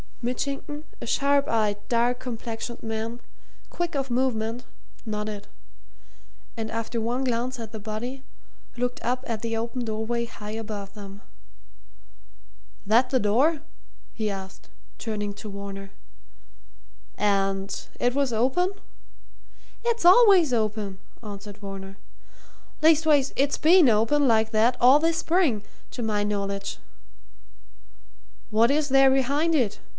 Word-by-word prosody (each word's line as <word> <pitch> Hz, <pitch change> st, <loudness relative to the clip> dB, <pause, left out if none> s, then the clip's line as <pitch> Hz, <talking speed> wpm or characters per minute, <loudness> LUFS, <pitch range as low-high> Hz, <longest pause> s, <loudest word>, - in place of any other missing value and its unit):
Mitchington, 280 Hz, +4 st, -3 dB, 0.2 s
a -, -, -7 dB
sharp 280 Hz, 0 st, +2 dB
eyed, 215 Hz, -3 st, +1 dB
dark 240 Hz, +1 st, +1 dB
complexioned 235 Hz, -1 st, -6 dB
man, 225 Hz, +2 st, -4 dB, 0.5 s
quick 345 Hz, -2 st, -3 dB
of 270 Hz, -2 st, -2 dB
movement, 240 Hz, -2 st, 0 dB, 0.4 s
nodded, 210 Hz, -2 st, -4 dB, 1.1 s
and 225 Hz, -1 st, -4 dB
after 230 Hz, +1 st, -3 dB
one 240 Hz, +4 st, -1 dB
glance 250 Hz, 0 st, -1 dB
at 225 Hz, -2 st, -7 dB
the 220 Hz, -, -7 dB
body, 230 Hz, +6 st, -5 dB, 0.5 s
looked 245 Hz, 0 st, -2 dB
up 250 Hz, +2 st, -1 dB
at 225 Hz, -2 st, -3 dB
the 230 Hz, -1 st, -2 dB
open 235 Hz, +2 st, -3 dB
doorway 225 Hz, +2 st, -2 dB
high 210 Hz, -2 st, -9 dB
above 210 Hz, -3 st, -6 dB
them. 200 Hz, -1 st, -10 dB, 1.6 s
"That 230 Hz, +5 st, +4 dB
the 260 Hz, -, +2 dB
door?" 265 Hz, +9 st, +2 dB, 0.5 s
he 215 Hz, -2 st, -2 dB
asked, 195 Hz, -1 st, -8 dB, 0.3 s
turning 210 Hz, -2 st, -3 dB
to 210 Hz, +1 st, -8 dB
Varner. 195 Hz, 0 st, -7 dB, 1.3 s
"And 195 Hz, -1 st, 0 dB, 0.3 s
it 245 Hz, 0 st, +2 dB
was 275 Hz, -2 st, +1 dB
open?" 265 Hz, -, +1 dB, 1.1 s
"It's 470 Hz, -4 st, 0 dB
always 370 Hz, -, +7 dB
open," 215 Hz, -4 st, -1 dB, 0.2 s
answered 205 Hz, -1 st, -8 dB
Varner. 195 Hz, -1 st, -8 dB, 0.8 s
"Least 320 Hz, 0 st, +5 dB
ways, 285 Hz, -3 st, +3 dB
it's 280 Hz, +1 st, +1 dB
been 330 Hz, -3 st, +6 dB
open, 230 Hz, +7 st, +3 dB
like 220 Hz, -1 st, +3 dB
that, 230 Hz, +3 st, +3 dB
all 260 Hz, +4 st, +7 dB
this 330 Hz, +1 st, +1 dB
spring, 320 Hz, -, +1 dB, 0.3 s
to 245 Hz, -, -5 dB
my 210 Hz, -2 st, 0 dB
knowledge." 200 Hz, -1 st, -3 dB, 1.7 s
"What 225 Hz, +2 st, +4 dB
is 295 Hz, +1 st, +1 dB
there 270 Hz, 0 st, +6 dB
behind 280 Hz, +5 st, +2 dB
it?" 240 Hz, -8 st, +1 dB
230 Hz, 125 wpm, -25 LUFS, 210-270 Hz, 1.7 s, always